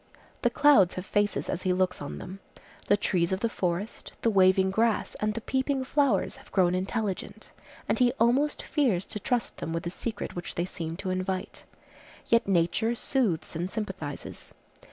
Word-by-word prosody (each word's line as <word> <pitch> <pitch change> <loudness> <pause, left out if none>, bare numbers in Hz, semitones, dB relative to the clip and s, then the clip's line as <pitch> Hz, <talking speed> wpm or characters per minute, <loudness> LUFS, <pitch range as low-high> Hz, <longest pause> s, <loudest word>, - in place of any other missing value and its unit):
The - - +3
clouds 290 - +5
have 185 - -5
faces 205 +1 0
as 185 - -2
he 185 - +1
looks 180 -2 0
on 145 - -5
them. 190 +2 -8 0.5
The 205 - +4
trees 180 -4 +1
of 190 +1 -1
the 230 - +2
forest, 185 +2 -3
the 230 - +3
waving 190 -1 +4
grass 225 +2 +1
and 215 0 0
the 230 - -3
peeping 265 +2 0
flowers 265 -6 +1
have - - -17
grown 180 -2 +3
intelligent; 195 +1 -3 0.4
and - - +1
he 245 -1 +5
almost 265 +5 +2
fears 240 - +1
to 210 - -5
trust 240 +1 -1
them 165 - -4
with 165 - -2
the 170 - -3
secret 225 +3 -5
which 175 - -5
they 175 - 0
seem 165 -2 -5
to 190 -1 -3
invite. 185 0 -3 0.6
Yet 230 -1 +3
nature 195 +5 +2
soothes 220 - -1
and 175 +3 -2
sympathizes. 190 -9 -6
195 Hz, 175 wpm, -28 LUFS, 180-230 Hz, 0.6 s, clouds